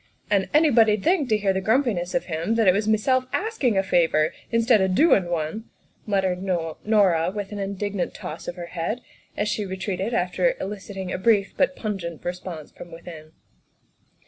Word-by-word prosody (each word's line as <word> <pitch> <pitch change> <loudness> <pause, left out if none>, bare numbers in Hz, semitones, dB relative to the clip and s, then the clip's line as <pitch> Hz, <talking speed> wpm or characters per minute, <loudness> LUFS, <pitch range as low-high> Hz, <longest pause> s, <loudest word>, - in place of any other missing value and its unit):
"And 195 -2 +2
anybody 235 -9 +5
'd 195 - -10
think, 330 -7 +2
to 215 - +3
hear 200 -2 +1
the 190 - -1
grumpiness 215 -5 +1
of 260 - 0
him, 170 +6 -2
that 225 -3 +2
it 185 - +7
was 205 +2 -1
meself 255 +4 +2
askin' 365 - 0
a 195 - +3
favor, 165 -4 +2 0.2
instid 230 -2 +4
o' 190 - +3
doin' 195 - +4
one," 170 +6 -3 0.4
muttered 190 -3 0
Norah 180 0 +1
with 205 -1 -4
an 205 - -5
indignant 200 0 -3
toss 155 - -7
of - - -4
her 175 -2 -6
head 185 +8 -2 0.4
as 205 - 0
she 210 0 -1
retreated 190 +2 -3
after 235 - +1
eliciting 195 -2 -6
a - - -3
brief 205 -1 +2
but 275 0 +1
pungent 185 -7 -5
response 175 -3 -6
from 175 - -12
within. 165 -2 -11
195 Hz, 175 wpm, -24 LUFS, 180-225 Hz, 0.4 s, it